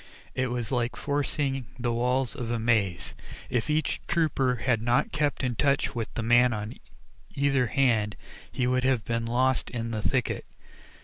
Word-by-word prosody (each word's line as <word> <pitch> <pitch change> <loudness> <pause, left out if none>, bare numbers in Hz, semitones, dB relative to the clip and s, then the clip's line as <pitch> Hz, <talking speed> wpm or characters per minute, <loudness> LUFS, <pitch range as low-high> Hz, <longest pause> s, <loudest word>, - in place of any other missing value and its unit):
It 130 0 0
was 120 -1 -3
like 120 -2 0
forcing 140 -3 -1
the 120 -1 -1
walls 125 +2 +1
of 120 -2 -4
a 120 - 0
maze. 110 -6 +1 0.4
If 120 +3 0
each 155 +1 0
trooper 140 -6 +2
had 120 -1 0
not 120 +5 +2
kept 145 -2 0
in 125 -1 0
touch 140 +3 +2
with 115 -2 -3
the 115 - -2
man 120 +2 +5
on 105 0 -4 0.6
either 140 -3 +2
hand 110 -5 +2 0.4
he 125 - 0
would 130 0 +1
have 130 -5 +2
been 115 0 -1
lost 130 +2 +1
in 115 -1 -4
the 110 -1 -2
thicket. 125 +2 -1
125 Hz, 170 wpm, -27 LUFS, 115-135 Hz, 0.6 s, man